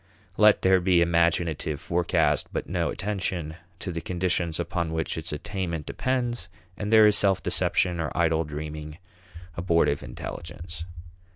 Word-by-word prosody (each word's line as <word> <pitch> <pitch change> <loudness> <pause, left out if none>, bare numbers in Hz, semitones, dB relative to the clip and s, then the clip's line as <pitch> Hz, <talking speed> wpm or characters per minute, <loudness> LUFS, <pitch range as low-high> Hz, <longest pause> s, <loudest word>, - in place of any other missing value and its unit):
Let 105 -1 +5
there 95 0 +5
be 90 -1 +4
imaginative 85 -3 +1
forecast 85 0 +1
but - - -3
no - - -1
attention 90 -5 -3 0.2
to 90 - -4
the 85 -1 -4
conditions 90 -2 -1
upon 85 -1 -2
which 80 -1 -1
its 80 0 -5
attainment 85 0 -4
depends, 120 -4 -1 0.3
and 105 0 -4
there 110 -1 +8
is 105 -1 +5
self 95 -2 +2
deception 90 -2 +1
or 80 -3 -1
idle 80 -1 +2
dreaming 75 0 -6 0.6
abortive 85 -1 +2
intelligence. 85 0 -7
85 Hz, 135 wpm, -26 LUFS, 80-95 Hz, 0.6 s, there